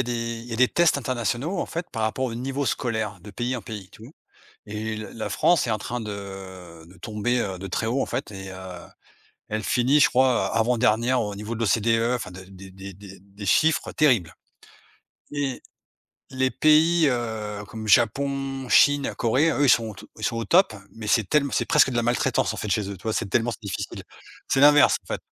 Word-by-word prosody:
a - - +3
des 120 0 -4 0.3
il - - -12
y 120 - -8
a - - -2
des 130 +1 +4
tests 170 -4 +3
internationaux 130 - -2
en - - -2
fait, 170 +1 -5
par 110 - -4
rapport 110 +4 -1
au 115 -3 -3
niveau 135 +3 -3
scolaire 110 -5 -2
de 105 +3 -11
pays 120 +4 -3
en 115 - -7
pays 105 -4 -8
tout 115 +5 -13 0.6
et 110 +1 -4
l 110 0 -7
la 115 - -4
France 170 -7 +2
est - - -2
en 110 - 0
train 120 +5 -4
de 95 -5 -8
de 90 - -17
tomber, 115 +3 -1
heu, 95 -4 -3
de 95 - -7
très 110 +4 -2
haut 125 +4 0
en - - -2
fait - - -4
et 95 -1 -8
heu, 95 - -9 0.9
elle 110 +1 -3
finit, 130 +7 +3
je - - +6
crois, 130 -1 +2
heu, - - +3
avant-dernière 120 +1 +2
au 105 -2 -4
niveau 105 +3 -5
de - - -7
l'OCDE 115 +2 +2
enfin, 105 -7 -6
de 95 +1 -10
des 95 0 -13
des 95 +1 -10
des 100 +1 -12
chiffres 155 - +2
terribles 120 - +2 1.0
et 140 -3 -3 0.7
les 130 0 0
pays, 155 +2 +4
heu, 110 -4 -3
comme 110 -1 -7
Japon, 135 +3 +1
Chine, 145 +1 +4
Corée. 130 +7 +2
Eux, 145 -2 +1
ils - - +3
sont 115 -1 +3
au 110 - -8
t 95 - -13
ils - - -5
sont 115 - -1
au 115 - -2
top 180 - +4 0.2
mais 110 -1 -8
c'est 110 -1 +3
tellem 140 -2 +2
c'est - - +1
presque 150 -4 +4
de 120 - -3
la 120 - +2
maltraitance 120 +1 0
en - - -7
fait, 105 - -4
chez 100 0 0
eux, 100 - -6
tu 90 - -19
vois? 110 - -2
C'est 110 - -1
tellement 120 +4 +1
s - - -7
difficile. 100 -4 -5 0.4
C'est 135 - +1
l'inverse, 145 0 +6
en - - -30
fait. - - -6
115 Hz, 225 wpm, -24 LUFS, 105-130 Hz, 1.0 s, je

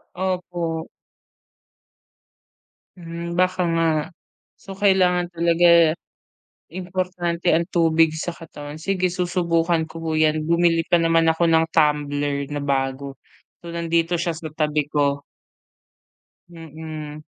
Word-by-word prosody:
Opo. 175 -3 -3 2.1
Hmm, 170 0 -6
baka 185 0 +2 0.2
nga 165 - +2 0.7
so 195 - -10
kailangan 185 -3 +2
talaga 170 -1 +4 0.8
importante 180 -1 -3
ang 170 +1 +3
tubig 165 -2 +3
sa 160 +2 -5
katawan, 150 -3 -8
sige 185 +2 -1
susubukan 170 -2 0
ko 165 +1 -9
po 160 - -2
yan. 155 0 +2
Bumili 170 0 +2
pa 175 - +2
naman 165 0 +3
ako 170 +1 +1
ng 160 0 +4
tumbler 145 -2 +1
na 145 - -2
bago 135 0 -2 0.5
so 170 - -7
nandito 170 0 0
siya 170 -2 -2
sa 155 -2 -8
tabi 150 -1 0
ko. 145 -1 0 1.3
Mm. 155 -2 -9
165 Hz, 110 wpm, -22 LUFS, 155-175 Hz, 2.1 s, talaga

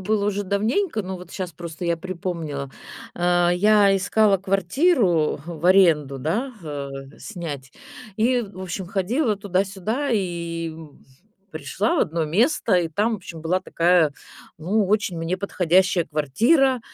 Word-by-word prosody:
было 205 +1 0
уже 205 0 -1
давненько, 220 - 0
но 190 0 -5
вот 180 -1 -12
щас 185 -3 -5
просто 170 +1 -7
я 170 -1 +1
припомнила. 165 -5 -5 0.4
А, 175 0 +2
я 200 +2 +4
искала 200 +1 +3
квартиру, 195 - +1
в 170 0 -4
аренду 160 -8 +4
да, 215 - -2
а, 145 -3 -5 0.3
снять 150 -10 -7 0.4
и, 245 +3 +2
в 195 -3 -10
общем, 185 0 -5
ходила 215 - 0
туда-сюда 200 +7 -2
и 170 -4 -2 0.8
пришла 160 - -1
в - - +1
одно 165 -1 0
место. 220 - +2
И 175 -2 +2
там, 210 +8 0
в - - -3
общем, 165 -4 -10
была 175 +4 0
такая, 170 -4 +2 0.5
ну, 195 +5 +1
очень 205 -4 0
мне 165 +3 -2
подходящая 185 -2 +2
квартира. 235 - +2
185 Hz, 140 wpm, -23 LUFS, 165-210 Hz, 0.8 s, я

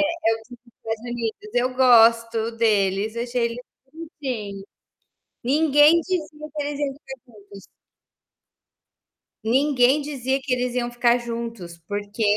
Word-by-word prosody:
o 300 -8 0
dos 245 -1 -12
Estados 225 -1 -6
Unidos. 240 - -5
Eu 255 +1 +1
gosto 230 -2 +4
deles. 210 -1 +1
Achei 240 0 -1
eles 235 +1 -6 0.3
bonitinhos. 255 - -6 0.8
Ninguém 295 +4 +5
dizia 310 -4 -4
que 295 - -2
eles 290 0 -4
iam 280 -2 -1
ficar 270 -1 -11 0.2
juntos. 200 -2 -14 1.8
Ninguém 265 +3 +3
dizia 270 -2 -2
que 265 -2 -3
eles 250 0 -1
iam 240 -1 -1
ficar 240 0 +3
juntos, 230 -7 -6
porque 205 +2 -4
245 Hz, 120 wpm, -23 LUFS, 225-285 Hz, 1.8 s, Ninguém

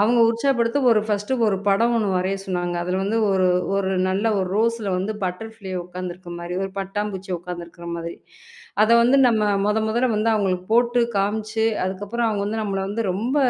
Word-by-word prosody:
அவுங்க 235 +3 +4
உற்சாகப்படுத்த 235 +1 +1
ஒரு 220 - +4
ஃபர்ஸ்டு 210 +4 -1
ஒரு 195 -2 +2
படம் 230 +5 +3
ஒன்னு 215 -3 +1
வரையச் 195 +2 -1
சொன்னாங்க. 175 -1 -2
அதுல 180 +2 -1
வந்து 205 +3 0
ஒரு 190 -1 +3 0.3
ஒரு 190 -1 0 0.2
நல்ல 195 +3 -1
1 185 -1 -1
ரோஸ்ல 230 -2 +1
வந்து 195 +4 -2
பட்டர்ஃப்ளை 195 +2 -5
உக்காந்துருக்க 180 0 -7
மாரி, 175 +1 -5
1 195 - -3
பட்டாம் 205 +2 -2
பூச்சி 190 +1 -7
உக்காந்துருக்கிற 170 0 -8
மாதிரி. 170 0 -6 0.7
அத 215 - +4
வந்து 250 +4 +4
நம்ம 220 -2 +2 0.2
மொத 210 +1 +2
மொதல்ல 240 +4 +1
வந்து 215 +2 +2
அவுங்களுக்கு 185 -3 -1
போட்டுக் 235 0 +3
காம்ச்சு 215 +2 0 0.2
அதுக்கப்புறம் 205 +5 -2
அவுங்க 205 -2 -1
வந்து 220 +1 -2
நம்மள 195 -2 -2
வந்து 225 +3 -2
ரொம்ப 235 +9 -2
205 Hz, 180 wpm, -22 LUFS, 185-225 Hz, 0.7 s, அவுங்க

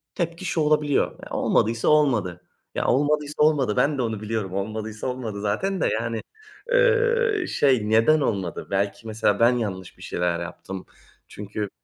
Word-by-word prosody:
Tepki 170 +1 -3
şu 165 - 0
olabiliyor. 150 -1 +1
Olmadıysa 115 +1 +1
olmadı. 120 - +2 0.3
Ya - - -1
olmadıysa 145 +3 +1
olmadı. 140 -8 +3
Ben 145 0 +2
de - - 0
onu 110 -3 -2
biliyorum. 105 -4 -3
Olmadıysa 110 +3 -4
olmadı 120 -5 -4
zaten 165 - -1
de, - - +3
yani, 115 -1 -3 0.5
ııı, 470 -4 +3
şey 125 -7 +2
neden 115 +8 +4
olmadı? 95 -9 -2
Belki 100 +3 -1
mesela 110 -1 +1
ben 115 +1 +6
yanlış 95 -5 -5
bir - - -13
şeyler 85 -1 -1
yaptım. 90 +3 -7 0.4
Çünkü 105 0 -5
115 Hz, 145 wpm, -24 LUFS, 105-150 Hz, 0.5 s, ben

